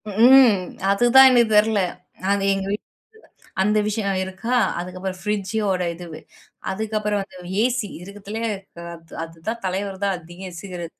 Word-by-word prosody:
ம் 240 Hz, +3 st, +7 dB, 0.4 s
அதுதான் 240 Hz, +6 st, +7 dB
எனக்கு 240 Hz, -3 st, +4 dB
தெரியல. 210 Hz, -1 st, +3 dB, 0.5 s
அது 200 Hz, 0 st, +1 dB
எங்க 195 Hz, 0 st, -3 dB
வீட்ல 205 Hz, -, -1 dB, 0.8 s
அந்த 210 Hz, +2 st, +2 dB
விஷயம் 205 Hz, -2 st, -1 dB
இருக்கா! 190 Hz, +6 st, -3 dB, 0.2 s
அதுக்கப்புறம் 185 Hz, +1 st, -5 dB
ஃப்ரிட்ஜோட 200 Hz, -1 st, -1 dB
இது, 170 Hz, -2 st, -9 dB, 0.5 s
அதுக்கப்புறம் 210 Hz, 0 st, -1 dB
வந்து 190 Hz, -1 st, -13 dB, 0.3 s
ஏசி 245 Hz, -3 st, 0 dB
இருக்கிறதுலயே 205 Hz, +4 st, -5 dB, 0.5 s
அத் 165 Hz, -1 st, -17 dB
அதுதான் 165 Hz, +8 st, -6 dB
தலைவர் 190 Hz, +1 st, -3 dB
தான் 200 Hz, -1 st, +1 dB
அதிகம் 175 Hz, +2 st, -10 dB
சிகரெட் 175 Hz, -3 st, -7 dB
200 Hz, 125 wpm, -22 LUFS, 185-220 Hz, 0.8 s, ம்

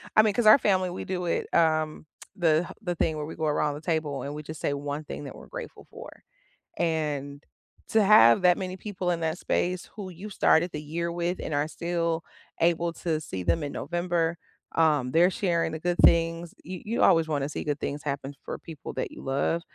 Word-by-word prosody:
I 215 Hz, -, +9 dB
mean, 210 Hz, -2 st, +2 dB
'cause 235 Hz, +1 st, 0 dB
our 215 Hz, -, +10 dB
family, 185 Hz, -5 st, +2 dB
we 175 Hz, -, -5 dB
do 180 Hz, -1 st, -3 dB
it, 170 Hz, -, -1 dB
um, 155 Hz, -2 st, +2 dB, 0.3 s
the 165 Hz, -1 st, +2 dB
the 180 Hz, -4 st, -2 dB
thing 160 Hz, -1 st, 0 dB
where 150 Hz, -, -3 dB
we 160 Hz, -, -7 dB
go 160 Hz, -, -2 dB
around 150 Hz, -1 st, +1 dB
the 150 Hz, -, -8 dB
table, 160 Hz, -4 st, -1 dB
and 140 Hz, -, -5 dB
we 150 Hz, +1 st, -6 dB
just 155 Hz, +1 st, -8 dB
say 145 Hz, -, 0 dB
1 145 Hz, +1 st, -4 dB
thing 145 Hz, -, -7 dB
that 135 Hz, -, -8 dB
we're -, -, -12 dB
grateful -, -, -8 dB
for. -, -, -10 dB, 0.7 s
And 150 Hz, -4 st, -2 dB, 0.5 s
to 220 Hz, -1 st, +4 dB
have 155 Hz, -, +7 dB
that 180 Hz, -1 st, +5 dB
many 185 Hz, -1 st, -4 dB
people 185 Hz, -3 st, -3 dB
in 170 Hz, -, -1 dB
that 160 Hz, +1 st, -1 dB
space 180 Hz, +1 st, -1 dB
who 200 Hz, -4 st, -6 dB
you 185 Hz, +4 st, -9 dB
started 175 Hz, -3 st, +3 dB
the 150 Hz, -, -5 dB
year 170 Hz, +3 st, -3 dB
with 175 Hz, +1 st, -2 dB
and 155 Hz, -, -4 dB
are 145 Hz, +1 st, +1 dB
still 170 Hz, 0 st, -2 dB, 0.4 s
able 170 Hz, 0 st, +2 dB
to 160 Hz, -2 st, -2 dB
see 95 Hz, -10 st, -5 dB
them 160 Hz, -, +1 dB
in 145 Hz, -, -3 dB
November, 175 Hz, -1 st, -1 dB, 0.4 s
um, 150 Hz, -6 st, +3 dB
they're 170 Hz, +4 st, +5 dB
sharing 175 Hz, -3 st, 0 dB
the 160 Hz, -, -4 dB
good 175 Hz, +2 st, -1 dB
things, 165 Hz, 0 st, +4 dB
you 180 Hz, +2 st, -7 dB
you 225 Hz, +3 st, 0 dB
always 165 Hz, -1 st, +5 dB
wanna 145 Hz, -3 st, -1 dB
see -, -, -4 dB
good 145 Hz, -1 st, -2 dB
things 145 Hz, +1 st, -3 dB
happen 140 Hz, -1 st, -3 dB
for -, -, -5 dB
people 160 Hz, -4 st, -9 dB
that -, -, -3 dB
you -, -, -10 dB
love, 140 Hz, +5 st, 0 dB
165 Hz, 215 wpm, -27 LUFS, 150-180 Hz, 0.7 s, our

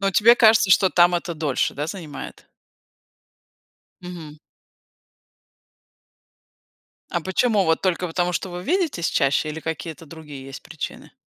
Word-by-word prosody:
А -, -, -4 dB
вот 195 Hz, -, -1 dB
тебе 235 Hz, +3 st, +6 dB
кажется, 220 Hz, -3 st, +5 dB
что 190 Hz, 0 st, +5 dB
там 175 Hz, 0 st, +4 dB
это 170 Hz, 0 st, -5 dB
дольше, 150 Hz, -4 st, -1 dB
да, 145 Hz, +2 st, -3 dB
занимает? 165 Hz, -6 st, -8 dB, 1.6 s
Мгм. 165 Hz, -4 st, -9 dB, 2.7 s
А 175 Hz, -, -1 dB
почему 200 Hz, +3 st, +1 dB
вот 160 Hz, 0 st, +1 dB
только 180 Hz, -1 st, 0 dB
потому, 175 Hz, +1 st, -1 dB
что 185 Hz, +3 st, -3 dB
вы 175 Hz, 0 st, -7 dB
видитесь 315 Hz, -, 0 dB
чаще, 140 Hz, +2 st, +1 dB
или 155 Hz, +1 st, -6 dB
какие-то 160 Hz, +1 st, -6 dB, 0.2 s
есть 135 Hz, -2 st, -9 dB
причины? 160 Hz, -2 st, -8 dB
175 Hz, 130 wpm, -22 LUFS, 155-190 Hz, 2.7 s, тебе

